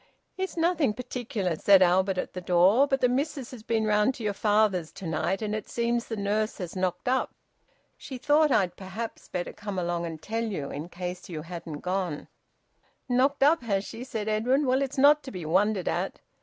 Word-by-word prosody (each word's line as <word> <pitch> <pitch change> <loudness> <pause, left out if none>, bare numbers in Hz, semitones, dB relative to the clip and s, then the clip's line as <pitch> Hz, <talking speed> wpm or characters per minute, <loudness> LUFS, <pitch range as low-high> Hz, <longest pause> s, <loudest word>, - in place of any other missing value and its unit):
"It's 380 -1 -4
nothing 330 -8 +2
particular," 235 -7 -3
said 195 +3 +6
Albert 185 +2 +2
at - - -3
the 180 - -5
door. 185 +9 +4
"But 270 -1 0
the 250 - +5
missus 270 0 -2
has 250 -4 -9
been 220 0 0
round 210 +4 +2
to 230 - -8
your 205 -1 0
father's 205 -5 +2
to 190 - -9
night, 175 +5 -1
and 210 0 -2
it 215 -1 -4
seems 235 0 -1
the 225 - -3
nurse 210 +2 -1
has 180 -2 -6
knocked 185 +2 -2
up. 260 +1 0 0.6
She 260 - -7
thought 300 +4 +3
I'd 185 -6 +2
perhaps 195 +5 -7
better 175 -1 -4
come 205 -2 -6
along 175 -1 -1
and 160 -1 -7
tell 225 +7 -3
you, 185 -11 -4
in 150 +4 -6
case 180 +1 -6
you 155 -3 -5
hadn't 165 -3 -7
gone." 180 -4 -3 0.8
"Knocked 270 +3 +2
up, 305 +2 +5
has 200 -4 -1
she?" 230 - -7
said 220 -5 -4
Edwin. 245 +7 +2
"Well, 260 +1 +2
it's 275 -1 -3
not 290 +2 +6
to 265 - -8
be 180 -9 -7
wondered 190 +4 +1
at. - - -2
210 Hz, 200 wpm, -27 LUFS, 180-250 Hz, 0.8 s, said